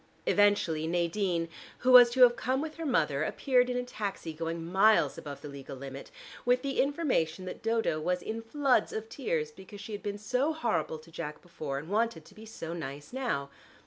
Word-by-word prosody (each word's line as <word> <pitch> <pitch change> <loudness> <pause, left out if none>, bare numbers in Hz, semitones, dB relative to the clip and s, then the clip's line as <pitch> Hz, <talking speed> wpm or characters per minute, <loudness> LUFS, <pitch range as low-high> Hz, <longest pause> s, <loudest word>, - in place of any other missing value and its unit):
Eventually 185 -6 +3
Nadine 170 0 0 0.3
who 255 - +2
was 245 -1 +10
to 255 +1 +5
have 240 -1 +7
come 260 +1 0
with 310 +1 -5
her 330 -1 -3
mother 150 - +1
appeared 250 - +2
in 250 - -1
a 250 - -1
taxi 205 -8 -5
going 165 +1 -4
miles 195 +5 +4
above 145 -2 -8
the - - -7
legal 140 -1 -8
limit, 135 +1 -8 0.3
with 250 +1 +2
the 275 -1 +1
information 255 - 0
that 185 - -7
Dodo 225 -8 0
was 180 +3 -1
in 225 +1 -4
floods 270 +3 +1
of 220 0 -5
tears 160 - -2
because 190 +4 -12
she 210 +2 -8
had 205 - -5
been 205 0 -4
so 255 +8 0
horrible 170 - -1
to 160 +2 -16
Jack 150 -2 -6
before, 155 -6 -5
and 145 +3 -6
wanted 205 -5 0
to - - -16
be 220 +2 -12
so 165 -6 -6
nice 145 - -7
now. 225 - -2
200 Hz, 200 wpm, -30 LUFS, 160-245 Hz, 0.3 s, was